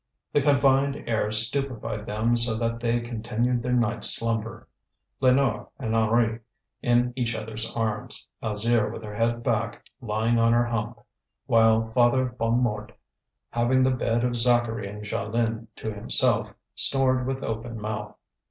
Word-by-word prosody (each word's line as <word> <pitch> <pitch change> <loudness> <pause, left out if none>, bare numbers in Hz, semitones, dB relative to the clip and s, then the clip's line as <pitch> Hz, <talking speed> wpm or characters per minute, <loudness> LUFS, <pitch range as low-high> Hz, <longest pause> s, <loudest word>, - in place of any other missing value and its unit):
The 145 - +3
confined 140 0 +2
air 110 -2 0
stupefied 115 -1 0
them 110 +3 +1
so 115 -1 +5
that 115 0 -2
they 120 0 0
continued 120 +1 -1
their 125 +1 -2
night's 120 -3 +1
slumber: 115 -1 -1 0.5
Lénore 130 -4 +2
and 115 -4 -2
Henri 115 0 +2 0.4
in 120 0 +2
each 120 -3 -1
other's 110 +1 -5
arms, 110 -2 -3
Alzire 110 +1 +1
with 110 - -8
her 105 -1 -7
head 115 +2 0
back, 115 0 -1 0.2
lying 115 +1 0
on 115 0 +4
her 120 0 +3
hump; 115 -2 -3 0.5
while 110 0 +3
Father 125 +1 +2
Bonnemort, 115 -2 0 0.6
having 120 +2 +2
the 130 - +3
bed 120 -2 0
of 125 -1 0
Zacharie 120 -3 +1
and 105 +1 -8
Jeanlin 115 +2 -2
to 110 - -5
himself, 105 - +1 0.2
snored 130 -2 +2
with 135 0 -3
open 115 +1 -4
mouth. 105 0 -5
115 Hz, 145 wpm, -25 LUFS, 110-120 Hz, 0.6 s, so